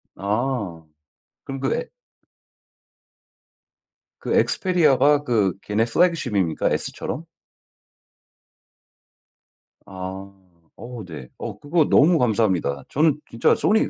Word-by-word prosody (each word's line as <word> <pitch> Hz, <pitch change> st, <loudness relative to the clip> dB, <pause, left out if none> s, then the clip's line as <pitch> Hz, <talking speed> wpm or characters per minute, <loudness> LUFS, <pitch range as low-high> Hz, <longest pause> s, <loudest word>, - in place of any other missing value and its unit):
아. 105 Hz, -5 st, -2 dB, 0.6 s
그럼 135 Hz, 0 st, -6 dB
그 -, -, 0 dB
에 -, -, -3 dB, 2.3 s
그 -, -, -2 dB
Xperia가 150 Hz, -5 st, +3 dB
그 105 Hz, -, +1 dB
걔네 105 Hz, +2 st, 0 dB
flagship입니까? 120 Hz, -, +1 dB
S처럼? 160 Hz, -, -3 dB, 2.6 s
아. 95 Hz, +1 st, -7 dB, 0.5 s
어 120 Hz, -2 st, -7 dB
네. 75 Hz, -7 st, -9 dB
어 -, -, -6 dB
그거 160 Hz, +2 st, +2 dB
너무 165 Hz, +4 st, +5 dB
감사합니다. 100 Hz, -, +1 dB
저는 150 Hz, 0 st, +2 dB
진짜 115 Hz, -, +2 dB
Sony 220 Hz, +2 st, +2 dB
120 Hz, 220 characters per minute, -23 LUFS, 95-150 Hz, 2.6 s, 너무